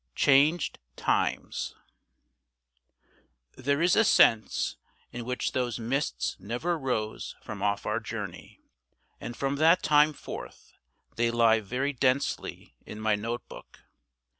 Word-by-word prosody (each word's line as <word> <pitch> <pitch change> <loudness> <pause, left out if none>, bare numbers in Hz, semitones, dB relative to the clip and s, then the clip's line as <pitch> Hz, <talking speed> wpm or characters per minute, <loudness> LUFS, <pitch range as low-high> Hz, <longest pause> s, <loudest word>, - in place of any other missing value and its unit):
CHANGED 145 +4 +3 0.2
TIMES - - -1 1.8
THERE 140 +4 0
is 175 - +4
a 225 - +5
sense 115 - +3 0.3
in 120 -1 -6
which 125 +1 -2
those 125 -4 -1
mists 115 - -2
never 125 - -2
rose 125 -7 -3
from 105 -3 -7
off 100 0 0
our 105 +2 0
journey; 105 -5 -7 0.6
and 120 - -7
from 140 +1 -1
that 165 +4 +4
time 150 +1 +5
forth - - -9 0.4
they 120 0 +2
lie 115 -1 +4
very 125 +7 -2
densely 130 +1 -1
in 105 - -9
my 110 -1 +1
note 115 +3 -3
book. - - -13
120 Hz, 120 wpm, -28 LUFS, 110-140 Hz, 1.8 s, a